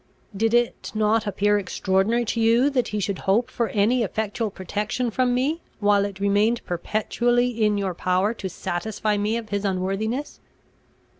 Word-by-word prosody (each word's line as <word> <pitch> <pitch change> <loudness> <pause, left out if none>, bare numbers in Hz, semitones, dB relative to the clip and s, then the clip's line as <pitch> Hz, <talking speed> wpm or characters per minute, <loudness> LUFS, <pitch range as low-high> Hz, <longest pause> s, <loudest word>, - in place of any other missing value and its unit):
"Did 225 +3 +2
it 240 0 0
not 215 0 +2
appear 205 +1 +2
extraordinary 195 +4 0
to 230 - -2
you, 235 +5 +4
that 255 -3 +1
he 210 - -3
should 200 -1 -2
hope 230 +6 +1
for 235 - 0
any 220 +5 +2
effectual 220 +1 -2
protection 210 +6 -3
from 250 +2 +1
me, 295 +7 0 0.2
while 205 -1 +3
it 200 -1 -6
remained 205 +4 +2
perpetually 240 +7 0
in 210 -1 +3
your 195 -2 -1
power 185 +5 +1
to 195 -4 -5
satisfy 210 +5 -2
me 210 +3 0
of 225 -2 -7
his 205 0 -2
unworthiness?" 200 +8 -2
215 Hz, 160 wpm, -24 LUFS, 200-235 Hz, 0.2 s, you